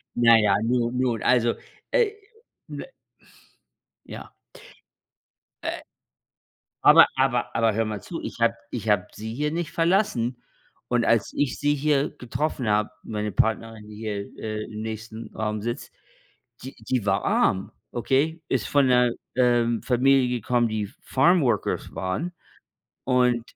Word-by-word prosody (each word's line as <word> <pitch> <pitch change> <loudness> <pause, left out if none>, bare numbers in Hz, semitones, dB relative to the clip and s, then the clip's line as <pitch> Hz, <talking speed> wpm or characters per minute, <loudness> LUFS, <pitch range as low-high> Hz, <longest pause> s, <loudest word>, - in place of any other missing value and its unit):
Na 115 -1 +6
ja, 105 -2 +3
nun 120 +1 0
nun, 120 -4 0
also, 120 -2 +3 0.4
äh, 465 -4 +3 0.6
n - - -6 1.2
Ja. - - -9 1.3
Äh, - - -3 1.0
aber 165 +2 +8
aber 130 -2 0
aber 115 -2 +2
hör 115 +1 0
mal 105 -2 -4
zu, 170 - -7
ich - - -7
habe 115 0 +3 0.2
ich 110 -2 -4
habe 105 -1 +2
sie 110 +1 -6
hier 150 +4 -1
nicht 170 -1 -3
verlassen. 165 - +1 0.5
Und 120 -1 +1
als 115 -4 +2
ich 145 -3 0
sie 145 0 +2
hier 145 0 +1
getroffen 130 0 -3
habe, 105 0 +2
meine 105 -1 -3
Partnerin, 110 +1 -1
die 105 - -11
hier, 105 -2 -5
äh, 110 -1 -4
im 110 -1 -7
nächsten 110 +1 -7
Raum 105 -1 -2
sitzt, 120 +2 -5 0.7
die 130 - -8
die 110 0 -2
war 95 - +1
arm, 95 0 +1 0.2
okay? 145 +7 0
Ist 125 -6 0
von 145 -2 +3
'ner, 125 -1 +4 0.2
ähm, 120 -2 +2
Familie 130 0 +3
gekommen, 120 +1 +1
die 110 -1 -2
F 100 - -15
Farmworkers 135 - +1
waren 95 - -3 0.7
und 125 -2 +2
120 Hz, 140 wpm, -25 LUFS, 110-130 Hz, 1.3 s, aber